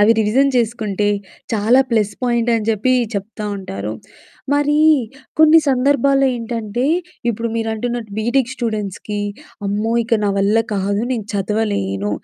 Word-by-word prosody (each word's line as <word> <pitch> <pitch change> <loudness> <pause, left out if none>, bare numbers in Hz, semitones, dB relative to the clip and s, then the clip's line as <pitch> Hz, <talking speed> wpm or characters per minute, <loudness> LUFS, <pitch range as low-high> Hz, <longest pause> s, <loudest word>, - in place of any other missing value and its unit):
అవి 210 +2 +6
రివిజన్ 240 +6 +3
చేసుకుంటే 215 -4 0 0.5
చాలా 225 +5 +4
ప్లస్ 215 -3 +1
పాయింట్ 240 -1 +1
అని 220 -2 -1
చెప్పి 225 +4 +2 0.2
చెప్తా 210 +2 -5
ఉంటారు. 105 - -5 0.6
మరీ 290 +1 +2 0.6
కొన్ని 315 +1 +7
సందర్భాల్లో 275 +1 +3
ఏంటంటే 230 +1 -3 0.4
ఇప్పుడు 230 +1 -3
మీరంటున్నట్టు 225 0 -3
బీటెక్ 240 +3 +1
స్టూడెంట్స్‌కి 210 -2 -3 0.5
అమ్మో 210 +3 -1
ఇక 225 -1 +1
నా 200 - +2
వల్ల 200 +3 +2 0.2
కాదు, 200 +1 0
నేను 220 -4 -3
చదవలేను 195 - -1
225 Hz, 125 wpm, -19 LUFS, 205-245 Hz, 0.6 s, కొన్ని